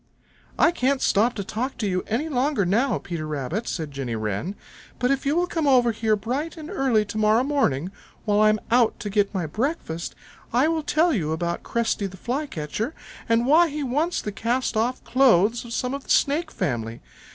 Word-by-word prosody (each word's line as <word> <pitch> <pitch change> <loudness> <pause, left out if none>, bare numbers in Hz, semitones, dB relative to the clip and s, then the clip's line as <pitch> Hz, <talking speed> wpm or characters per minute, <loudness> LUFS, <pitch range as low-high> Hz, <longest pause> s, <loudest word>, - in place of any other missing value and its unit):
"I 340 - +5
can't 275 -4 +1
stop 230 +2 +2
to 200 - -3
talk 230 +7 -4
to 215 - -1
you 185 -1 -1
any 245 +9 -1
longer 270 -6 +1
now, 215 +5 +2
Peter 165 -3 -5
Rabbit," 150 - -3
said 155 -4 -3
Jenny 135 -4 -4
Wren, 110 - -3 0.4
"but 250 +2 +1
if 275 0 -1
you 290 - +2
will 350 +1 +2
come 325 -4 -1
over 250 -3 +5
here 220 -1 +1
bright 260 +11 -3
and 315 +2 -8
early 255 - +2
to 210 +1 -5
morrow 215 +3 +4
morning, 190 - 0 0.3
while 205 -1 +2
I 215 0 +6
am 215 0 +2
out 235 -1 +3
to 205 - -4
get 205 -1 +2
my 185 -5 -2
breakfast, 210 - -3 0.4
I 250 +6 +3
will 325 -1 0
tell 315 +3 +2
you 160 - -1
about 170 +1 -2
Cresty 225 -3 -1
the 190 0 -11
Flycatcher 240 - -3 0.3
and 230 +1 +3
why 320 +6 +5
he 295 0 -4
wants 295 +7 0
the 210 - -3
cast 235 +5 -1
off 235 +4 0
clothes 235 -4 +3
of 235 - -10
some 250 +2 -2
of 280 0 -5
the - - -19
Snake 305 +4 +2
family. 115 -3 -3
230 Hz, 200 wpm, -24 LUFS, 195-275 Hz, 0.4 s, I